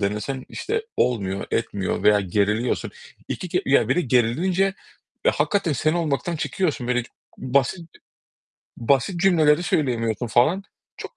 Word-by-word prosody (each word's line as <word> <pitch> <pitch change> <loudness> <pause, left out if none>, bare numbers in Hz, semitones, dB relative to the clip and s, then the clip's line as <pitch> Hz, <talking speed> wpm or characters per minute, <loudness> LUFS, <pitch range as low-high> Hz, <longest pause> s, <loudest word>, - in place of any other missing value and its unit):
denesen, 105 +7 -2
işte 445 +3 -3
olmuyor, 100 -5 0
etmiyor 100 -4 -2
veya 105 -1 +5
geriliyorsun. 105 +5 0 0.4
İki 180 - -4
ker - - 0
ya 135 - +3
bir - - +2
de - - +3
gerilince 155 +9 +2 0.6
ya - - +4
hakikaten 200 -6 0
sen 155 +3 +1
olmaktan 165 0 -1
çıkıyorsun. 155 -5 -2
Böyle 125 0 +1 0.4
basit 140 +6 0 0.9
basit 140 - +1
cümleleri 165 -4 +4
söyleyemiyorsun 120 -8 0
falan. 150 - +2 0.3
Çok - - -9
135 Hz, 130 wpm, -23 LUFS, 115-170 Hz, 0.9 s, veya